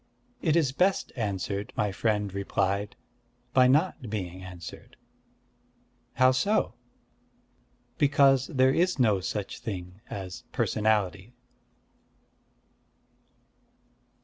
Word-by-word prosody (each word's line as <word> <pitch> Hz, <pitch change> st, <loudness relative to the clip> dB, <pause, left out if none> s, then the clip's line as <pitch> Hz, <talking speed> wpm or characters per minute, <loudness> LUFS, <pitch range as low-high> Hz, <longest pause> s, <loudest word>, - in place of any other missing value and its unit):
"It 160 Hz, -2 st, +2 dB
is 155 Hz, -6 st, +3 dB
best 185 Hz, +7 st, +1 dB
answered," 100 Hz, -1 st, -3 dB
my 105 Hz, -1 st, +1 dB
friend 105 Hz, -1 st, -1 dB
replied, 100 Hz, +1 st, -1 dB, 0.6 s
"by 130 Hz, -1 st, +6 dB
not 145 Hz, -, +1 dB
being 95 Hz, -4 st, -4 dB
answered." 90 Hz, -3 st, -10 dB, 1.2 s
"How 130 Hz, -1 st, +5 dB
so?" 200 Hz, +12 st, +1 dB, 1.3 s
"Because 140 Hz, -2 st, +4 dB
there 130 Hz, -3 st, +3 dB
is 180 Hz, +3 st, +2 dB
no 110 Hz, -7 st, +3 dB
such 100 Hz, +2 st, -4 dB
thing 95 Hz, -5 st, -6 dB
as 95 Hz, -2 st, -6 dB
personality." 105 Hz, 0 st, 0 dB
110 Hz, 90 wpm, -28 LUFS, 100-135 Hz, 1.3 s, by